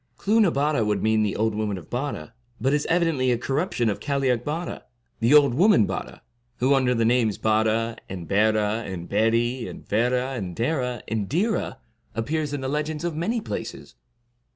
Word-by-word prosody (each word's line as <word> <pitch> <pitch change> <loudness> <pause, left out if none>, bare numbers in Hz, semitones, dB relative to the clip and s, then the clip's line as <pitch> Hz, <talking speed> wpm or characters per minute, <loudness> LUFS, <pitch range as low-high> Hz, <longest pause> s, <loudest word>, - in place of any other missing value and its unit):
Clooth 220 +3 +2
na 200 - +5
Bare 145 -4 +1
would 105 -2 0
mean 110 0 +3
the 105 -2 0
old 110 +1 +1
woman 105 -2 -2
of 85 -4 -12
Bare, 125 -2 -4 0.3
but 135 +2 +1
is 150 0 0
evidently 165 -7 +2
a 120 - +2
corruption 135 -1 -1
of 105 - -1
Cailleac 135 -4 0
Bare, 165 +5 -4 0.4
the 115 +2 +2
old 140 -4 +6
woman 170 - +5
Bare, - - -5 0.4
who, 130 +3 +3
under 130 -2 +2
the 115 -1 +1
names 115 -3 +2
Bare, 110 +1 +1
and 90 -3 -6
Berah, 110 +2 +2
and 85 -2 -6
Beri, 115 +3 +1
and - - -10
Verah, 125 +4 +1
and 95 -8 -5
Dera, 125 - -1
and 105 -3 -2
Dhira, 205 - 0 0.4
appears 150 +6 -1
in 145 -2 -3
the 130 - -3
legends 150 +2 -2
of 170 -2 -2
many 220 +9 -1
places. - - -6
125 Hz, 180 wpm, -24 LUFS, 110-145 Hz, 0.4 s, old